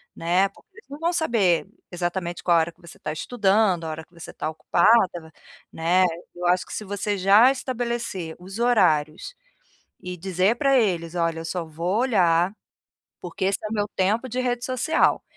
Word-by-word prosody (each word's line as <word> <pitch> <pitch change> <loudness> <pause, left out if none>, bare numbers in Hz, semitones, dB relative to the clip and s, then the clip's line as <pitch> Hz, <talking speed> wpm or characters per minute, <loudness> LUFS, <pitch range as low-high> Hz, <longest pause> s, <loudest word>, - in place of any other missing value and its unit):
né, 180 +4 +1
porque - - -23
eles 460 - -17
não 285 +1 -8
vão 335 +2 0
saber, 230 - +2 0.3
exatamente 175 0 -3
qual 175 -2 +4
a - - +5
hora 160 +1 -2
que 175 - -29
você 170 - -14
tá 155 - -4
estudando, 195 -2 +1
a - - -4
hora 160 +1 -6
que - - -44
você 170 -1 -10
está - - -4
ocupada, 175 0 +2 0.4
né, 175 +3 +2 0.3
eu 175 0 -5
acho 180 +1 +2
que - - -10
se - - -4
você 205 +1 -2
já 200 +7 +6
estabelecer 235 -10 -4
os 190 +4 -9
horários, 180 - +2 0.7
e 180 0 -6
dizer 190 +5 +1
pra 275 -1 +3
eles: 175 -7 0
"Olha 165 -1 0
eu - - -7
só 175 +1 -3
vou 170 +6 -2
olhar, 180 -7 +2 0.7
porque 180 +1 -5
esse 195 - +1
é 215 - -4
meu 205 -2 0
tempo 215 +7 +1
de 250 +2 -2
rede 245 -1 -1
social, 255 +4 +1
185 Hz, 185 wpm, -24 LUFS, 170-230 Hz, 0.7 s, já